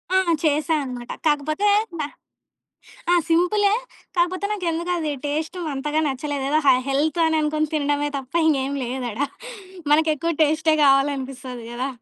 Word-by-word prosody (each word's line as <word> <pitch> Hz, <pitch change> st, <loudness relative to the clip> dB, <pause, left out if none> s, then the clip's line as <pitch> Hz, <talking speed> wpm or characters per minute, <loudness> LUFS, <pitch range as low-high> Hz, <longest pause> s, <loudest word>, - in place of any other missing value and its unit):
ఆ! -, -, +6 dB, 0.3 s
చేసా 305 Hz, +1 st, +2 dB
అనమాట. 250 Hz, -2 st, -7 dB, 0.2 s
కాకపోతే 305 Hz, +7 st, +1 dB, 0.3 s
న -, -, 0 dB, 1.1 s
ఆ! -, -, +6 dB
సింపులే. 400 Hz, +5 st, +3 dB, 0.4 s
కాకపోతే 365 Hz, +3 st, +1 dB
నాకు 385 Hz, -4 st, -3 dB
ఎందుకో 340 Hz, +2 st, -3 dB
అది 310 Hz, -3 st, -2 dB
టేస్టు 315 Hz, +5 st, -3 dB
అంతగా 295 Hz, +3 st, -1 dB
నచ్చలేదు. 275 Hz, +1 st, -3 dB
ఏదో 305 Hz, -, +3 dB
హై 265 Hz, -2 st, +7 dB
హెల్త్ 300 Hz, +4 st, +1 dB
అని 320 Hz, -1 st, +2 dB
అనుకోని 305 Hz, 0 st, 0 dB
తినడమే 290 Hz, 0 st, +1 dB
తప్ప 265 Hz, 0 st, -11 dB
ఇంగేం 280 Hz, -2 st, +1 dB
లేదాడ. 245 Hz, -2 st, -4 dB, 0.7 s
మనకెక్కువ 315 Hz, +1 st, +2 dB
టేస్టే 310 Hz, +1 st, +3 dB
గావాలనిపిస్తది 270 Hz, -3 st, +1 dB
గదా! 255 Hz, +3 st, -2 dB
300 Hz, 135 wpm, -23 LUFS, 270-320 Hz, 1.1 s, హై